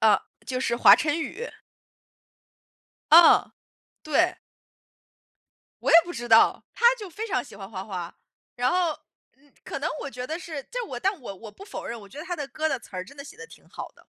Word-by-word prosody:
呃， 220 -2 +5 0.3
就 255 -1 -2
是 235 -2 0
华 - - +8
晨 300 +2 0
宇。 475 +9 -5 1.6
啊， 335 +1 +7 0.5
对。 305 -3 +2 1.5
我 - - 0
也 330 - +9
不 350 - -7
知 240 -4 -6
道， 225 0 +5
他 - - -6
就 410 -3 -7
非 430 +7 -6
常 400 - -1
喜 - - -14
欢 195 -1 -9
花 190 -3 -5
花， 180 -4 -6 0.4
然 250 +1 +1
后， 355 -2 +2 0.5
嗯， 285 0 -28
可 - - -5
能 290 - -1
我 280 - -5
觉 250 0 -6
得 320 +4 -4
是 310 -6 -7
就 - - -6
是 - - -3
我 245 -7 -6
但 390 +2 0
我 200 -5 -7
我 220 +2 -11
不 385 - -13
否 405 - -8
认， 235 - -5
我 200 - -13
觉 280 - -12
得 310 - -6
他 355 -1 -4
的 290 - -4
歌 315 +5 -2
的 270 - -1
词 - - -17
儿 185 0 -4
真 280 - -15
的 280 - -8
写 360 - -12
得 460 - -10
挺 - - -18
好 - - -8
的。 - - -22
280 Hz, 235 characters per minute, -25 LUFS, 235-345 Hz, 1.6 s, 也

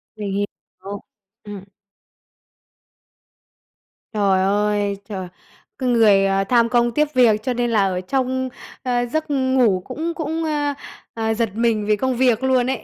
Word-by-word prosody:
Mình 205 -2 -4 0.6
hiểu. 205 - -5 0.4
Ừm. 205 -2 -8 2.5
Trời 195 -3 +2
ơi, 205 0 +1
trời! 190 -3 -5 0.5
Cái 255 -2 -1
người, 210 -5 +5
ờ, 195 0 +1
tham 235 +2 +3
công 240 -1 +2
tiếc 300 +3 0
việc 220 -4 +4
cho 255 - -1
nên 240 0 -1
là 205 -3 +3
ở 180 -1 -2
trong, 260 +4 -1 0.3
ờ, 245 -1 0
giấc 315 +6 -2
ngủ 260 -8 +2
cũng 320 +6 -4
cũng, 320 0 -3
a, 295 -2 -1 0.4
à, 225 -1 -1
giật 230 -1 0
mình 225 -2 +1
vì 210 - +3
công 260 +3 -1
việc 250 -1 +2
luôn 260 -1 +2
ấy. 265 - -3
235 Hz, 150 wpm, -21 LUFS, 205-260 Hz, 2.5 s, người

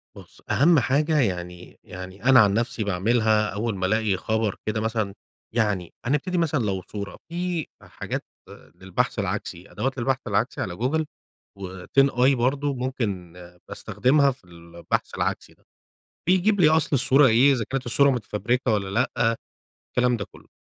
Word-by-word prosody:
بُص، - - -15
أهم 160 +1 +4
حاجة 145 +4 +1
يعني 90 -5 -3
يعني 95 +3 -10
أنا 130 0 +6
عن 100 -3 +5
نفسي 115 0 -1
باعملها 105 +2 +1
أول 110 +1 -2
ما 95 -1 -2
الاقي 105 -1 +1
خبر 110 -2 -1
كده 110 0 -1
مثلًا 110 -3 -2 0.4
يعني 105 -7 -1
هنبتدي 150 +8 0
مثلًا 155 -6 +1
لو 95 -2 -1
صورة، 100 +1 -7
في 175 -2 -2
حاجات - - -6 0.5
للبحث 95 -1 -2
العكسي، - - -4
أدوات 135 +1 -3
للبحث 130 +2 0
العكسي 105 +4 -1
على 85 - -4
جوجل 145 - 0 0.6
وTinEye 125 +8 +2
برضو 135 +3 0
ممكن 110 -9 -3 0.4
باستخدمها 140 +2 +2
في 125 - -10
البحث 85 -1 -5
العكسي - - -3
ده، - - -34 0.6
بيجيب 190 +3 +3
لي 155 -3 +6
أصل 160 0 +3
الصورة 135 +2 +6
إيه، 125 +4 +5
إذا 120 -4 -1
كانت 135 -1 -3
الصورة 140 +4 +4
متفبركة 120 +1 -1
والّا 100 -2 -1
لأ، 115 +1 +1 0.6
الكلام 125 -1 +2
ده 100 - -4
كله. - - -17
115 Hz, 150 wpm, -24 LUFS, 100-135 Hz, 0.6 s, أنا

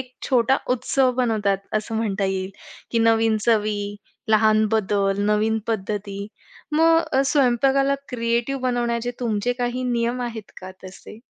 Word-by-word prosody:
एक 255 -1 -9 0.2
छोटा 260 0 +3 0.2
उत्सव 255 +1 +1
बनवतात 215 -5 +1 0.2
असं 215 +1 -3
म्हणता 205 -3 -1
येईल, 190 0 -2 0.4
की 230 - +1
नवीन 225 -1 +3
चवी, 210 -2 +1 0.4
लहान 215 0 +4
बदल, 200 -2 +1
नवीन 215 +1 +1
पद्धती. 200 -2 -3 0.5
मग 325 -3 +3
स्वयंपाकाला 275 0 +2
क्रिएटिव्ह 235 +2 -1
बनवण्याचे 240 -1 -1
तुमचे 225 0 0
काही 245 +1 -2
नियम 235 +1 -1
आहेत 225 -4 -6
का 185 - -8
तसे? 190 +3 -11
225 Hz, 125 wpm, -22 LUFS, 210-245 Hz, 0.5 s, लहान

